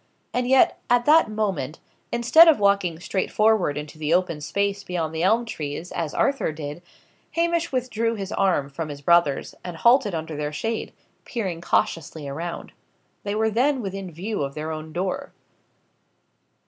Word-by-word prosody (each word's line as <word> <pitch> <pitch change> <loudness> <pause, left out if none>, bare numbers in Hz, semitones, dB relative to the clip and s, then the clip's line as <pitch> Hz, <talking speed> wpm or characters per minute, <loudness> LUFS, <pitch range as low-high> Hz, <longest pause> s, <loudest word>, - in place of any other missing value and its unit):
And 250 0 0
yet, 265 0 +4
at 240 0 +3
that 310 -4 +5
moment, 190 -10 -2 0.3
instead 235 +8 +6
of 320 - +6
walking 200 -5 +2
straightforward 195 -2 +1
into 150 +1 -7
the 155 +2 +2
open 180 -4 0
space 200 +5 -1
beyond 170 -4 -3
the 160 - -2
elm 225 +6 +3
trees, 155 -4 -5
as 160 -3 -3
Arthur 275 - +1
did, 150 +1 -7 0.5
Hamish 335 0 0
withdrew 230 -3 -1
his 195 -2 -5
arm 185 -8 +1
from 155 +2 -5
his 145 -1 -7
brother's, 160 -2 +2
and 175 -2 -6
halted 235 -2 +4
under 160 -1 -4
their 150 0 -3
shade, 225 +9 -3 0.3
peering 190 -9 -4
cautiously 160 -3 -1
around. 165 +5 -5 0.5
They 205 0 -3
were 220 0 +1
then 260 +5 +2
within 195 -1 -5
view 190 +5 -4
of 140 -1 -3
their 155 +1 -4
own 155 0 -6
door. 185 +3 -3
185 Hz, 160 wpm, -24 LUFS, 155-225 Hz, 0.5 s, instead